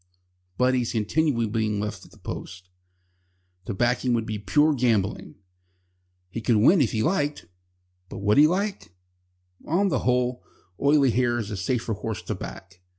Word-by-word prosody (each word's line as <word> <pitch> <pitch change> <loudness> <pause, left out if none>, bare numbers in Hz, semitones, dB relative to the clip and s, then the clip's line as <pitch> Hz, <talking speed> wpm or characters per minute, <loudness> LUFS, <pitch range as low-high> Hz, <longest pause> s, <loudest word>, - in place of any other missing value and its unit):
But 125 +1 +3
he 130 - +2
is 120 - -3
continually 115 +3 +1
being 105 -1 -1
left 105 0 -4
at - - -17
the - - -19
post. 95 -1 -8 1.0
To 115 - -3
back 120 +4 +1
him 125 -2 +1
would 115 -2 0
be 110 -2 -4
pure 145 - +3
gambling. 115 -7 0 1.0
He 115 - -5
could 115 +1 +2
win 140 - +5
if 125 - +2
he 110 -1 0
liked, 150 -4 -1 0.6
but - - -8
would 105 +5 +3
he 150 - +8
like? 195 - -3 0.7
On 195 +5 +2
the - - 0
whole, 125 0 0 0.4
Oily 140 -2 +4
Hair 120 0 +1
is 110 -2 -4
a - - -3
safer 115 +5 -2
horse 105 0 -5
to - - -3
back. 90 -1 -9
120 Hz, 170 wpm, -25 LUFS, 105-140 Hz, 1.0 s, he